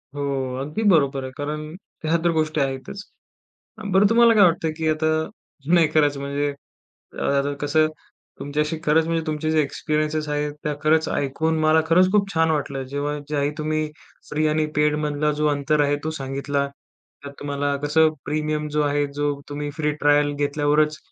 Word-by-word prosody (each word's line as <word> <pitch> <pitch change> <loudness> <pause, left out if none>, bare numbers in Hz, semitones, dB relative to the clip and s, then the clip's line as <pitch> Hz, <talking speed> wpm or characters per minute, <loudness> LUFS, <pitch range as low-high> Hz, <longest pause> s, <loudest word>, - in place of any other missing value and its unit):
हो, 145 - -4 0.4
अगदी 150 +11 -3
बरोबर 140 -6 +2
आहे. 130 - -6
कारण 150 +1 -3 0.4
ह्या 165 +2 +2
तर 170 - +3
गोष्टी 155 -2 0
आहेतच. 135 +9 -4 0.8
अ, - - -9
बरं, 200 +1 +5
तुम्हाला 235 0 +6
काय 205 - +7
वाटतं 165 -2 +1
की 160 -1 -1
आता 155 0 +1 0.7
नाही 165 -3 +5
करायचं? 145 -3 +2
म्हणजे 140 +1 -1 0.6
अ, - - -7
आता 140 0 +1
कसं 155 +2 +3 0.5
तुमच्याशी 150 +3 -2
खरंच 160 +2 +3
म्हणजे, 165 -1 -1
तुमचे 155 0 -2
जे 155 -1 +3
एक्सपिरियन्सेस 155 +1 -2
आहेत, 150 0 -1
त्या 150 - -1
खरंच 160 +1 +3
ऐकून 160 +4 -1
मला 155 +1 +4
खरंच 185 +3 +4
खूप 200 -2 +2
छान 160 0 +3
वाटलं. 140 -3 -2
जेव्हा 145 +1 -2
ज्याही 145 -1 0
तुम्ही 155 0 -1 0.4
फ्री 155 +1 +1
आणि 155 0 +1
पेडमधला 150 0 +1
जो 150 - +2
अंतर 145 +1 +1
आहे 145 0 +1
तो - - 0
सांगितला. 140 +1 -2 0.6
त्यात 140 0 -8
तुम्हाला 145 0 -2
कसं 155 +2 +4 0.2
प्रीमियम 150 0 -2
जो 150 - +3
आहे 145 0 +1
जो 145 0 0 0.2
तुम्ही 145 0 -4
फ्री 150 -1 +1
ट्रायल 145 0 +4
घेतल्यावरच, 150 +1 +1
150 Hz, 170 wpm, -23 LUFS, 145-155 Hz, 0.8 s, काय